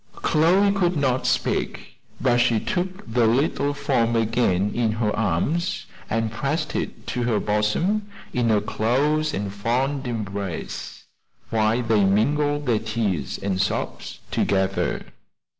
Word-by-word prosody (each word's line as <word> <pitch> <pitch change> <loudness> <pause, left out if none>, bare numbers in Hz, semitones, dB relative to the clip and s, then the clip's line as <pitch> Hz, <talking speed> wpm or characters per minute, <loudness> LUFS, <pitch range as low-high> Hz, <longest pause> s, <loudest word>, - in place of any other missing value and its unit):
Chloe 180 +6 +3
could 180 -4 +1
not 130 -3 +1
speak, - - -1 0.2
but 120 - +3
she 120 -2 +3
took 185 - -3
the 115 0 +2
little 140 +4 +1
form 120 -5 +1
again 110 -4 +1
in 115 -2 +1
her 110 -1 0
arms, 150 - 0 0.2
and 115 0 0
pressed 140 +6 -2
it - - -4
to 125 - -3
her 120 -3 +1
bosom 165 - 0 0.3
in 120 -2 +1
a 105 -2 +3
close 145 +9 +1
and 100 0 -3
fond 130 +6 -1
embrace, 100 -6 -5 0.5
while 110 +2 +2
they 110 -3 +3
mingled 145 +9 +2
their 115 -4 +2
tears 110 -6 -2
and 95 -1 -1
sobs 100 - -3
together. 95 -1 0
115 Hz, 130 wpm, -24 LUFS, 105-145 Hz, 0.5 s, Chloe